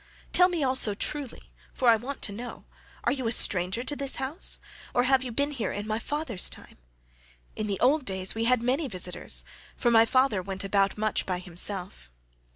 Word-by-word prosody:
Tell 360 0 +6
me 340 -5 -1
also 255 -6 +3
truly, 285 +2 -4 0.2
for 255 - 0
I 230 - +8
want 255 +6 -6
to - - +1
know, 235 +5 -8 0.4
are - - +2
you 260 -4 -2
a - - 0
stranger 190 +1 +2
to 290 - -1
this 275 -1 +1
house, 270 +7 -1 0.4
or 245 - +4
have 265 0 +3
you 250 - -5
been 280 +5 0
here 235 -9 -3
in 205 +1 -4
my 215 +1 -2
father's 270 - -1
time? - - -11 0.8
In 215 - -3
the 200 -2 -2
old 285 +4 +3
days 190 -4 -2
we 225 +1 -2
had 250 -1 +2
many 270 +5 +1
visitors 180 -5 -2 0.3
for 240 - +2
my 225 0 +6
father 255 -6 +2
went 190 +1 -6
about 195 0 +1
much 215 0 0
himself." 180 - -1
230 Hz, 190 wpm, -27 LUFS, 195-265 Hz, 0.8 s, I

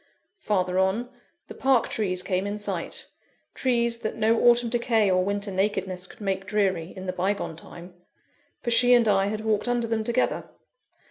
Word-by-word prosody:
Farther 185 - 0
on, 200 +6 0 0.4
the - - -9
Park 265 -3 +2
trees 185 -4 -2
came 185 +1 -1
in 205 +1 -3
sight 210 - -4 0.5
trees 235 -2 0
that 215 - -4
no 225 +1 +2
autumn 240 0 +3
decay 230 -4 +2
or 185 0 +3
winter 200 +1 -2
nakedness 190 -1 -1
could - - -16
make 195 -1 -2
dreary, 190 -5 0
in 185 - -7
the 185 - -3
bygone 190 -2 -2
time; 170 +2 -12 0.7
for 240 - -2
she 245 +1 +6
and 235 -2 +3
I 195 -1 +3
had 215 +1 -3
walked 215 0 0
under 240 -1 +1
them 225 -1 -1
together. 235 +3 -1
205 Hz, 175 wpm, -25 LUFS, 190-230 Hz, 0.7 s, she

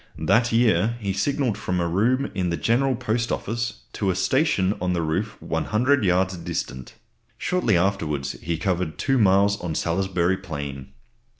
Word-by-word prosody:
That 120 +1 +2
year 115 -1 +3
he 100 -3 -2
signalled 125 +3 0
from 90 0 -1
a 85 - 0
room 120 +10 +1
in 95 -3 -1
the 85 - -1
General 130 +3 +2
Post 115 -1 -1
Office 115 +2 -3
to 100 - -1
a 90 - +1
station 100 - +2
on 90 0 0
the 85 - 0
roof 95 +7 -2
100 125 +4 +1
yards 95 0 +2
distant. 85 -7 -5 0.4
Shortly 180 - +1
afterwards 80 -7 0
he 85 0 -2
covered 90 -2 -1
2 135 -1 +1
miles 100 0 +3
on 85 -3 -3
Salisbury 90 +1 0
Plain. 70 -7 -6
95 Hz, 160 wpm, -24 LUFS, 85-115 Hz, 0.4 s, year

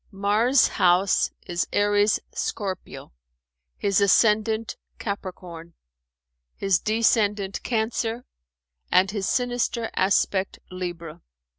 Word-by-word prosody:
Mars' 215 +6 +3
house 180 +2 +2 0.2
is 175 0 -2
Aries 205 +1 +2
Scorpio, 190 - -5 0.6
his 200 -1 +1
ascendant 220 +2 +2 0.2
Capricorn, 180 -4 -7 0.8
his 195 -4 +1
descendant 210 -2 +1
Cancer 230 +1 -2 0.7
and 185 +1 +4
his 200 -2 -2
sinister 245 -2 -1
aspect 190 0 +1
Libra." 175 -3 -6
200 Hz, 85 wpm, -24 LUFS, 185-220 Hz, 0.8 s, and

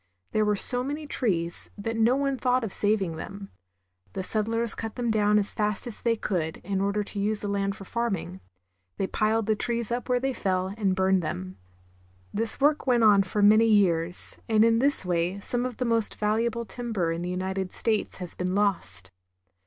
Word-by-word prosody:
There 215 0 +2
were 210 0 +2
so 245 +5 +3
many 295 +3 -4
trees 175 - -2
that 225 +3 -3
no 225 +3 +3
one 275 0 0
thought 250 0 +1
of 215 - -4
saving 200 -6 0
them. 195 +4 -8 0.6
The 190 - -3
settlers 225 +3 -1
cut 225 -1 -6
them 240 -2 -1
down 210 -1 +3
as 205 -1 +2
fast 210 +1 -1
as 240 -3 -7
they 230 -1 +2
could, 170 -7 -2
in 195 0 -1
order 200 +1 0
Lumbering. - - -5
to 205 - -3
use 210 +1 -1
the 205 - -3
land 200 0 -1
for 195 - -11
farming. 195 -5 -3 0.6
They 195 - 0
piled 215 +3 0
the 215 0 +2
trees 235 +1 -2
up 245 +1 -3
where 250 0 +3
they 270 +1 -1
fell, 185 -3 -1
and 200 -4 0
burned 190 0 +2
them. 95 - -5 0.8
This 225 +2 -1
work 290 0 +2
went 240 -2 +3
on 205 -2 +6
for 200 +2 -1
many 215 +2 +6
years, 180 -5 +3
and 220 0 +5
in 230 0 +3
this 280 -6 +2
way 175 +2 0
some 245 +4 -1
of 250 - -9
the 250 - -1
most 230 -2 0
valuable 230 +2 0
timber 220 -9 -2
in 165 +1 -3
the 175 - -3
United 190 +1 -3
States 220 -3 0
has 180 -2 -7
been 180 +1 -2
lost. 100 - -1
210 Hz, 200 wpm, -26 LUFS, 190-230 Hz, 0.8 s, on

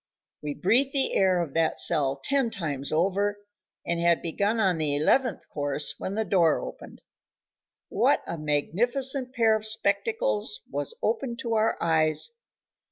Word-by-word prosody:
We 145 -1 -5
breathed 260 +8 +2
the 275 -2 +2
air 190 -2 +3
of 145 -5 -8
that 165 -1 0
cell 140 -5 +3
ten 275 -4 +1
times 150 -10 -4
over, 195 +5 0 0.5
and 170 0 -1
had 170 0 +2
begun 200 +7 -1
on 185 -6 +1
the 150 -2 +1
eleventh 225 - +1
course 145 0 +1
when 195 - -4
the 220 0 -1
door 170 -5 +3
opened. - - -10 0.9
What - - +2
a - - -5
magnificent 245 - -1
pair 230 -3 +3
of 215 - -3
spectacles 430 - -1
was 465 - -5
open 265 - -1
to 230 -2 -3
our 220 0 +1
eyes! 160 - +2
195 Hz, 150 wpm, -26 LUFS, 160-240 Hz, 0.9 s, air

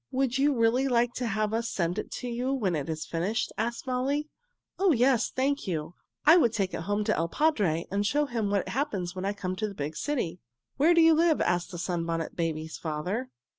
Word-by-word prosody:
"Would 265 0 0
you 280 -1 +3
really 235 +4 +3
like 240 -1 +2
to 250 - -1
have 215 0 -1
us 230 +1 -1
send 175 +2 -1
it - - -5
to 250 - -5
you 245 +2 -2
when 210 -11 0
it 145 0 -3
is 155 -1 -3
finished?" 185 +7 -1
asked 235 +4 -3
Molly. 270 +4 -1 0.5
"Oh, 385 -1 +4
yes, 245 -1 +3
thank 275 -1 -1
you! 160 -2 -3 0.3
I 315 +4 +8
would 235 -10 +3
take 195 -4 -1
it - - -3
home 205 +1 +1
to 215 0 +1
il 165 - 0
padre 195 - +1
and 200 +1 +1
show 295 +8 +2
him 230 -6 -2
what 200 -2 0
happens 205 - -2
when 185 +1 -4
I 200 - 0
come 185 -2 -4
to 215 - -1
the 200 - -8
big 150 0 -4
city." 185 - -2 0.4
"Where 320 +5 +5
do 335 - +6
you 325 0 +7
live?? 320 0 +3
asked 175 0 0
the 180 - -7
Sunbonnet 165 -2 -2
Babies' 160 -2 -3
father. 180 +11 -3
220 Hz, 220 wpm, -28 LUFS, 175-265 Hz, 0.5 s, I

